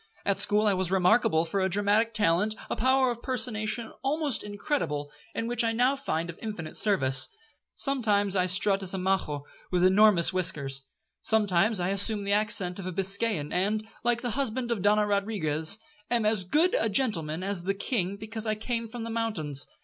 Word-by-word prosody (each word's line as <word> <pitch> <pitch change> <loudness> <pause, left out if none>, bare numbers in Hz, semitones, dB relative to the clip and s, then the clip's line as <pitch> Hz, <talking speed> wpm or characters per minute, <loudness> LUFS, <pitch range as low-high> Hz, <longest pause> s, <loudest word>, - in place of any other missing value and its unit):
At 200 -1 0
school 210 +1 +1
I 205 - +3
was 185 -2 -2
remarkable 180 -3 +3
for 180 +4 -2
a 190 0 +1
dramatic 205 +4 +1
talent, 210 0 +1 0.2
a - - 0
power 260 +1 +2
of 235 0 -7
personation 225 -2 -2
almost 285 -1 -1
incredible, 205 - -3 0.2
and 230 - -2
which 240 0 +1
I 225 0 0
now 250 +4 +2
find 170 -12 -3
of 170 - -9
infinite 205 -8 -6
service. 135 -11 +2 0.5
Sometimes 210 -8 0
I 185 -1 +2
strut 195 +2 +2
as 190 0 -2
a - - -2
Majo,1 185 -6 -1 0.3
with 180 0 +2
enormous 190 -2 +5
whiskers. 135 -7 +1 0.3
Sometimes 210 -1 +2
I 175 +1 -1
assume 200 +2 +4
the 200 0 0
accent 205 -4 0
of 190 - -6
a - - -3
Biscayan, 195 -3 0
and, 210 +4 0 0.2
like 240 0 0
the 245 - -2
husband 250 -1 -2
of 225 -5 -1
Donna 210 +2 +3
Rodriguez, 200 -5 0 0.3
'am 235 -3 +1
as 210 -3 +1
good 320 - +2
a 225 - 0
gentleman 185 - +1
as 190 -3 -3
the 195 +1 0
king, 200 -3 -2
because 220 +1 -5
I 215 - 0
came 230 +1 -4
from 235 0 -7
the 230 - -5
mountains.' 170 -12 0
205 Hz, 185 wpm, -27 LUFS, 185-225 Hz, 0.5 s, enormous